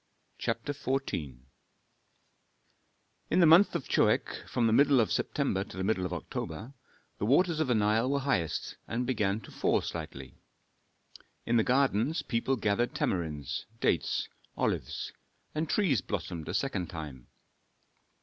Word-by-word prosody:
CHAPTER 145 - -2
XIV 130 - -2 1.9
In 180 - +3
the 175 - +7
month 165 +6 +7
of - - -3
Choeak - - +1
(from 120 - +1
the 110 - +3
middle 140 +1 +5
of 110 - +2
September 120 -10 0
to - - -11
the 95 - -2
middle 95 -3 +1
of - - -11
October), 90 - -5 0.5
the - - 0
waters 165 +5 +3
of 155 - +1
the 125 - +2
Nile 110 +3 +2
were 140 0 +1
highest, 90 - -1
and 120 +2 -1
began 105 -4 0
to - - -13
fall - - +2
slightly. 65 0 -7 1.1
In 120 - +2
the 110 - +4
gardens 135 - +2
people 120 +3 0
gathered 110 +1 0
tamarinds, 75 -6 -2
dates, 85 - +1 0.3
olives; - - -2 0.4
and 155 0 -2
trees 160 - +2
blossomed 85 -3 -4
a - - -2
second 100 - -1
time. 75 -7 -8
115 Hz, 140 wpm, -30 LUFS, 90-140 Hz, 1.9 s, the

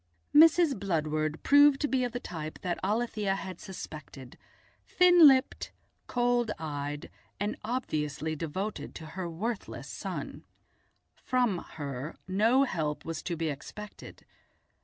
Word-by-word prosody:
Mrs. 320 - +6
Bludward 155 -4 -1
proved 285 -1 +6
to 295 - +2
be 260 -2 +1
of 245 - -1
the 245 - -4
type 155 -7 -6
that 175 -1 -2
Alethia 210 -1 0
had 190 -2 -7
suspected, 155 -6 -9 0.5
thin 355 -3 +7
lipped, 265 -2 +2 0.4
cold 245 -1 +1
eyed, 145 -1 -5 0.3
and 205 +1 -1
obviously 155 - -2
devoted 180 +7 -4
to 160 - -8
her 185 -1 -4
worthless 205 +6 -4
son. - - -6 0.8
From 245 -8 +1 0.2
her 140 0 -5
no 225 +8 +4
help 155 - -2
was 165 -2 -4
to 170 -2 -3
be 165 0 -1
expected. 205 +9 -9
190 Hz, 125 wpm, -29 LUFS, 155-245 Hz, 0.8 s, thin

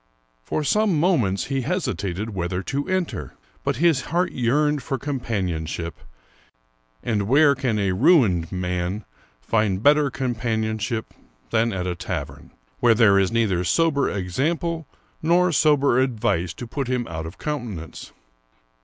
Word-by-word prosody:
For 150 - -2
some 205 0 +2
moments 130 - +2
he 135 -1 -2
hesitated 110 - -2
whether 90 -1 -3
to 140 +10 -3
enter, 185 -2 -2 0.3
but - - 0
his 160 0 +3
heart 175 +3 0
yearned 145 +4 +1
for 135 +2 -3
com 140 +1 -3
panionship, 85 -7 -3 1.1
and 105 -3 -1
where 140 +4 +5
can 130 -5 -1
a 100 -2 +1
ruined 100 - +3
man 90 +2 -2 0.4
find 105 - 0
better 145 0 +5
compan 120 -4 -2
ionship 110 +1 -2 0.5
than 115 0 +2
at 95 -3 -3
a 90 - -1
tavern, 85 - -6 0.3
where 120 -2 +5
there 105 -4 +5
is 95 -1 +1
neither 105 -6 +1
sober 145 - +2
exam 105 - -1
ple 165 -3 -4 0.3
nor 175 +3 +3
sober 145 -4 +3
advice 105 -9 0
to 125 - -7
put 135 +3 -4
him 125 -1 -1
out 80 -1 -5
of 80 - -10
countenance 120 - -5
115 Hz, 145 wpm, -23 LUFS, 95-145 Hz, 1.1 s, where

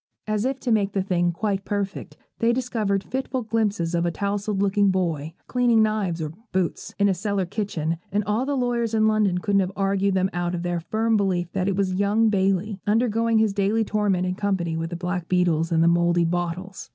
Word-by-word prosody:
As 215 +1 -1
if 265 0 -1
to 245 - -1
make 205 -3 +2
the 195 - 0
thing 175 -2 +1
quite 195 +2 -2
perfect, 200 -1 -4 0.2
they 230 +1 +3
discovered 220 -6 -1
fitful 260 -1 -3
glimpses 210 -6 -1
of 170 0 +1
a 175 - +1
tousled 200 +2 -2
looking 200 0 +3
boy, 165 -5 -1
cleaning 240 -3 +3
knives 200 -6 -1
or 150 - -4 0.2
boots, 185 -2 -2
in 200 - +3
a 195 - +3
cellar 200 +1 -1
kitchen; 170 -5 -2
and 210 +1 +1
all 210 +4 0
the 280 +1 -1
lawyers 240 -2 0
in 215 0 +3
London 210 -4 +2
couldn't 200 +2 +1
have 190 -1 0
argued 195 0 +1
them 190 0 +1
out 175 0 -1
of 170 - -4
their 175 -1 -1
firm 220 +6 0
belief 180 -4 0
that 185 -1 -1
it 195 - +1
was 190 -1 0
young 205 +4 +2
Bailey, 195 0 0
undergoing 230 +1 +2
his 220 -2 +2
daily 205 +3 +1
torment 205 -4 0
in 180 - -1
company 185 -4 -1
with 165 0 -3
the 175 - -5
black 180 0 -3
beetles 170 -3 +1
and 165 0 +3
the - - +4
mouldy 170 0 +3
bottles. 175 +2 -3
195 Hz, 210 wpm, -24 LUFS, 175-215 Hz, 0.2 s, the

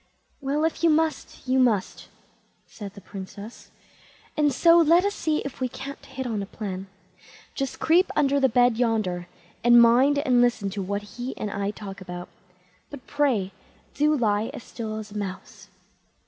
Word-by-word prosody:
"Well, 285 +3 0
if 325 - -2
you 335 - +6
must, 315 -3 -1
you 260 +1 +2
must", 225 -7 +1 0.6
said 205 -2 -10
the 200 - -11
Princess; 200 +3 -9 0.7
"and 295 -1 +3
so 335 +6 +5
let 335 +3 +5
us 405 - 0
see 310 -5 -1
if 275 -1 -7
we 255 - 0
can't 275 +3 -8
hit 265 - -6
on 220 -4 -2
a 195 - -5
plan. 195 -3 -6 0.7
Just 275 -2 -4
creep 350 +4 +3
under 280 -1 +3
the 265 -1 +3
bed 245 -1 +3
yonder, 215 -7 0 0.4
and 240 0 +7
mind 250 +5 +5
and 255 -4 +3
listen 235 -5 +1
to 200 0 -4
what 200 +2 -3
he 245 +5 -7
and 210 - -4
I 200 0 -2
talk 200 -2 -8
about. 180 -1 -7 0.6
But, 280 -4 -10
pray, 255 -10 0 0.4
do 300 +1 +2
lie 215 -2 +1
as - - -8
still 220 -2 -6
as 215 -1 -8
a 210 - -6
mouse." 190 -2 -7
240 Hz, 175 wpm, -25 LUFS, 205-280 Hz, 0.7 s, and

